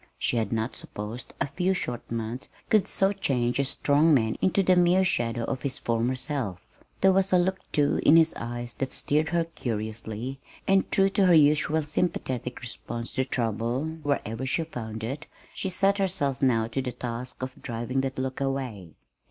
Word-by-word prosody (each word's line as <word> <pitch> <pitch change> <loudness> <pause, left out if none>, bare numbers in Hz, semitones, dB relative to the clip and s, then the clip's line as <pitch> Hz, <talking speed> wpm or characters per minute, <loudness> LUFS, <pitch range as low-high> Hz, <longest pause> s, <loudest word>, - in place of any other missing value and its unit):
She 120 - +1
had 110 -3 0
not 115 +1 -1
supposed 105 +4 -6
a - - +2
few 180 +6 0
short 120 -9 -4
months 115 +2 -4 0.2
could 215 -3 +4
so 195 +1 +2
change 125 -10 0
a - - +4
strong 145 +3 +3
man 110 -4 +1
into 195 +1 +3
the 185 0 +5
mere 180 +2 +4
shadow 120 -7 0
of 130 +1 -3
his 135 0 -2
former 120 +2 0
self. 130 - -3 0.4
There 190 0 +6
was 195 +1 +2
a 185 - +6
look, 190 +2 +1
too, 145 -1 +2
in 160 - +7
his 165 -1 +5
eyes 120 0 -5
that 135 -1 -1
stirred 155 +2 0
her 170 0 +2
curiously; 115 -3 -4 0.3
and, 195 0 +3
true 195 0 +4
to 195 -1 +3
her 175 - +7
usual 155 +1 +4
sympathetic 130 -5 -2
response 120 0 -5
to 130 - 0
trouble 115 +2 -1 0.2
wherever 130 -5 -2
she 165 +5 +1
found 110 -8 -6
it, 135 +7 -4 0.3
she 190 - -3
set 195 +2 +2
herself 145 -9 0
now 120 -4 +3
to 135 +4 -1
the 125 -1 -4
task 125 +1 -5
of 130 0 -6
driving 120 +2 -2
that 135 0 -3
look 130 +1 -3
away. 125 - -3
130 Hz, 185 wpm, -27 LUFS, 120-165 Hz, 0.4 s, in